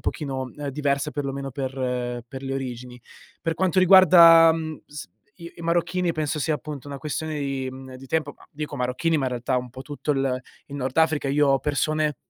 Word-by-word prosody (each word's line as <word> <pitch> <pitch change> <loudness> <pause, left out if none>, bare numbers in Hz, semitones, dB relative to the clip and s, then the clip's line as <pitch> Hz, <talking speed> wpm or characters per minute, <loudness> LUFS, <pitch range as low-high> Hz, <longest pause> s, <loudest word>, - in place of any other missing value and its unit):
pochino 135 -4 -4 0.2
diversa 140 +1 -1
perlomeno 140 -1 -4
per 125 -3 -3
per 130 +2 -9
le 135 0 -4
origini. 125 -2 -6 0.4
Per 165 -1 -1
quanto 185 0 +1
riguarda, 170 -3 +8
mhmm, 160 -1 -5
s 145 -6 -9 0.3
i 170 - -9
i - - -13
marocchini 175 +1 0
penso 155 -1 -2
sia, 155 +2 +1
appunto, 145 -2 -7
una 140 -1 -6
questione 155 +1 -4
di 135 -2 -3
mhmm, 130 0 -10
di 135 +1 -11
tempo, 160 -1 -1
ma - - -19
dico 150 0 -6
marocchini, 130 +6 0
ma 135 -3 0
in - - -2
realtà 125 +1 -1
un 125 -1 -3
po' 130 +1 -9
tutto 145 +1 -5
il 135 -2 0 0.3
il 140 - -10
Nord 130 0 -4
Africa. 155 -3 +2
Io 145 +1 +3
ho 135 0 +4
persone 150 0 0
145 Hz, 195 wpm, -24 LUFS, 130-155 Hz, 0.4 s, riguarda